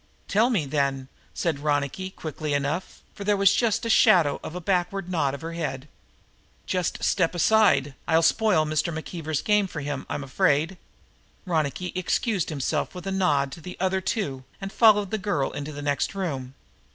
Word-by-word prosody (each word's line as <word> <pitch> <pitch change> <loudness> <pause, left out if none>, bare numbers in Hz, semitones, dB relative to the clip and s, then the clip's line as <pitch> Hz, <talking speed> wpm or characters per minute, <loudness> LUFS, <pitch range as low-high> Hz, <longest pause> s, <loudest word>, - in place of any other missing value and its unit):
"Tell 220 +5 +3
me, 200 - +1
then," 135 -2 -1 0.3
said 160 -5 -1
Ronicky 145 +5 -1
quickly 155 -4 -4
enough, 145 +6 -3
for 200 - -8
there 205 0 +2
was 195 -1 +5
just 225 -2 +1
the 230 - -2
shadow 160 -8 +5
of 160 - -7
a - - -3
backward 180 +1 -1
nod 145 -6 0
of 140 - -10
her 165 +1 -5
head. 145 -4 -4 0.8
"Just 180 -2 -2
step 180 -2 +1
aside. 170 -8 +4
I'll 165 0 +3
spoil 185 -2 +3
Mr. 155 +2 0
McKeever's 160 -1 -4
game 210 -2 +3
for 155 -4 -6
him, 145 -1 -4
I'm 145 - -3
afraid." 145 +6 +1 0.7
Ronicky 170 0 -1
excused 185 +2 0
himself 150 +3 -2
with 180 0 -8
a 195 - -2
nod 150 -8 +1
to 165 - -9
the 180 +3 -8
other 190 +1 +1
two 145 - -2 0.2
and 195 0 -6
followed 210 -4 +5
the 220 - -1
girl 180 -8 -1
into 145 +1 -5
the 145 -1 -7
next 145 +6 -1
room. 135 -9 -4
165 Hz, 175 wpm, -25 LUFS, 145-190 Hz, 0.8 s, was